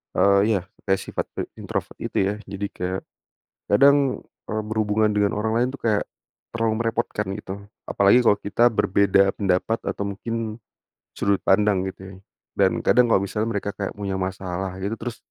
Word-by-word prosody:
eee, 100 0 +5 0.2
ya - - +1 0.3
kayak 95 0 +2
sifat - - -3
pe - - -2 0.2
introvert - - -4
itu - - -4
ya. 100 - -1
Jadi 100 +1 -4
kayak, 90 +1 -3 0.7
kadang, 140 +4 +4 0.2
eee, 110 0 -2
berhubungan 110 0 +1
dengan 105 -1 +2
orang 110 +1 0
lain 125 +1 +2
tuh - - -9
kayak 105 -2 +2 0.5
terlalu 115 -1 +1
merepotkan 115 -3 -1
gitu. 100 -2 -8 0.4
Apalagi 100 +5 +5
kalau 105 -2 +4
kita 105 +3 0
berbeda 100 -2 +3
pendapat 100 +3 0
atau 100 - -3
mungkin 115 +4 -5 0.8
sudut 100 -1 +1
pandang 100 -1 +3
gitu - - -33
ya, 95 - -10 0.4
dan - - +4
kadang 120 -1 +4
kalau - - +5
misalnya 105 +3 -2
mereka 100 -1 -3
kayak 100 -1 -3
punya 100 -1 -2
masalah 95 0 -3
gitu, 100 +4 -2
terus, 120 0 -6
100 Hz, 165 wpm, -23 LUFS, 95-110 Hz, 0.8 s, eee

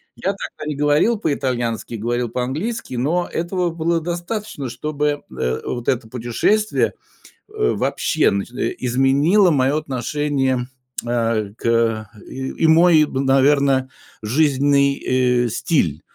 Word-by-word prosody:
Я 195 - -1
тогда 170 -5 -8
не 150 - -2
говорил 150 +11 +2
по-итальянски, 125 - -2
говорил 120 +2 -2
по-английски, 130 - -3
но 160 +9 0
этого 175 +1 -1
было 165 +1 0
достаточно, 175 - -4
чтобы, 145 +3 -2 0.2
э, 65 +1 -1
вот 120 -1 -4
это 120 -3 0
путешествие, 125 - 0 0.6
э, 430 0 0
вообще, 155 - +1
значит, 100 +4 -3
э, - - -1
изменило 140 - +3
мое 135 0 +2
отношение, 135 -2 -1 0.4
э, 115 -3 -1
к 115 -2 0 0.2
и 130 0 -5 0.2
и - - +6
мой, 160 -1 +6
наверно, 135 0 +2 0.3
жизненный, 140 +3 +2 0.5
э, - - -1
стиль. 90 - 0
140 Hz, 120 wpm, -20 LUFS, 120-160 Hz, 0.6 s, и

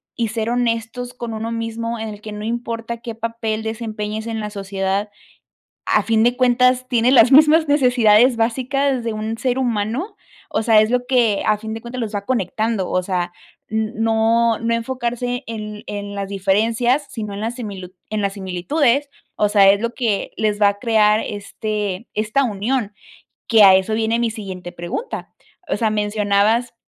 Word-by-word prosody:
y 230 -2 -1
ser 225 +1 -2
honestos 240 0 -2
con 235 -2 -6
uno 220 +1 -4
mismo 230 0 -3
en 220 - -4
el 210 -1 -9
que 215 - -8
no 210 0 -6
importa 235 0 -4
qué 230 -1 -6
papel 225 -1 -3
desempeñes 220 -1 -4
en 225 -1 -3
la 210 - -4
sociedad. 195 0 -2 0.8
A - - +2
fin 225 -1 +2
de 245 +1 +2
cuentas 250 0 +3
tiene 245 0 +2
las 250 -1 +6
mismas 305 +2 +6
necesidades 245 -4 +4
básicas 260 +3 0
de 230 - -2
un 220 +1 -4
ser 255 0 -1
humano. 245 - -2 0.3
O - - 0
sea, 220 -1 +5
es 215 +1 +1
lo 250 0 +1
que 235 -6 +2
a 215 -1 +3
fin 220 +1 -6
de 225 - -6
cuentas 245 +2 -7
los 225 -2 -3
va 200 0 -3
conectando. 220 -3 -1
O 185 - +1
sea, 175 -2 -2 0.4
no, 225 +1 +1
no 230 0 0
enfocarse 245 +1 -3
en 210 -2 -6
en 205 0 -5
las 200 -1 -4
diferencias, 225 +8 +1
sino 210 -3 -5
en 200 - -6
las 230 +3 -3
en 240 -4 -5
las 205 - -6
similitu 185 0 -10 0.2
en 215 - -1
las 200 -1 -1
similitudes. 235 - 0 0.3
O 210 - +1
sea, 200 -2 +5
es 200 +1 0
lo 235 +1 -2
que 225 -6 -1
les 210 -1 0
va 205 - +6
a 200 0 -5
crear 215 -1 +3
este 210 0 -4
esta 215 +6 +1
unión 220 0 -1 0.5
que 225 -3 +6
a 190 -1 +9
eso 190 +3 +1
viene 225 +1 +1
mi 235 -1 0
siguiente 190 -5 -7
pregunta. 175 - -5 0.4
O 195 - 0
sea, 220 0 +1
mencionabas 210 +2 +1
225 Hz, 185 wpm, -20 LUFS, 210-240 Hz, 0.8 s, a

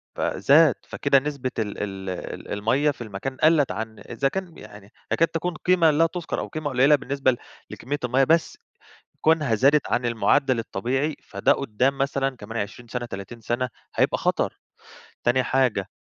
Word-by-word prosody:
ف - - -5
زاد، 150 +1 +4
فكده 140 -1 +2
نسبة 135 -2 -4
ال 105 -2 -3
ال 95 -1 -5
ال 90 - -6
المَيّة 125 +9 +1
في 135 - -12
المكان 110 +5 -6
قلت 155 -3 +4
عن 110 -1 -5
إذا 130 +4 -2
كان، 180 +2 -5
يعني 100 0 -13 0.2
تكاد 165 - +3
تكون 170 +2 -3
قيمة 170 -1 +3
لا 155 +3 +3
تذكر، 170 0 -3
أو - - -4
قيمة 155 -2 -4
قليلة 135 +3 +5
بالنسبة 140 -1 0
ل 120 - -4 0.3
لكمية 145 +2 -4
المَيّة، 130 +2 +2
بس 165 +4 +2 0.6
كونها 155 -7 +3
زادت 140 +6 +3
عن 120 - +1
المعدل 120 +2 +2
الطبيعي، 130 +8 -2
فده 140 - +1
قدام 135 +1 0
مثلًا 135 -1 0
كمان 115 +1 -7
20 115 +4 -5
سنة 120 +1 -4
30 100 +2 -8
سنة 120 +3 -1 0.3
هيبقى - - +2
خطر. - - -1 0.7
تاني 125 +2 +3
حاجة 125 -8 +1
130 Hz, 170 wpm, -24 LUFS, 115-145 Hz, 0.7 s, قليلة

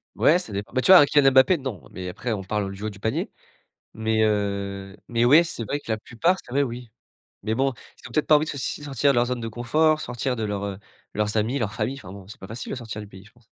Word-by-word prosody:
Ouais, 170 +4 +4
ça 180 - -7
dépend, 100 +3 -5
bah, 130 - +1
tu 190 - +4
vois, 185 - +11
un 145 - +7
Kylian 140 -2 +4
Mbappé, 130 +7 +5
non, 130 - -7
mais 90 0 -6
après 115 +6 -3
on 100 -2 -4
parle 100 +1 -2
du 100 - -9
haut 110 - -1
du 100 -1 -12
panier, 110 +2 -2 0.6
mais 110 0 +1
heu, 100 -2 -2
mais 120 0 +1
ouais, 150 +7 +7
c'est 165 -8 -5
vrai 145 +7 -3
que 115 - -6
la 110 - 0
plupart, 170 +13 0
c'est - - -15
vrai, 140 +2 +2
oui, 120 -1 -6 0.5
mais 110 +2 -1
bon, 135 0 +1
ils - - -15
ont - - -14
peut-être 155 - 0
pas 155 - +7
envie 150 +1 +3
de - - -4
si 140 +2 -3
de - - -8
sortir 140 0 +1
de - - -1
leur 120 0 +3
zone 125 0 -3
de 115 - -4
confort, 155 +8 +1
sortir 125 0 -2
de 110 - -3
leurs, 105 -1 -3
heu, 100 -1 -3
de 100 - -17 0.4
leurs 105 0 0
amis, 115 +6 0
leur 105 -5 -2
famille. 130 +6 -2
Enfin 95 -9 -11
bon, 95 -1 -11
c'est 105 - -12
pas 95 - -9
facile 115 +4 -7
de - - -2
sortir 110 -3 -7
du 105 - -9
pays 95 0 -14
je 105 - -18
pense. 120 -1 -27
115 Hz, 290 wpm, -24 LUFS, 105-135 Hz, 0.6 s, vois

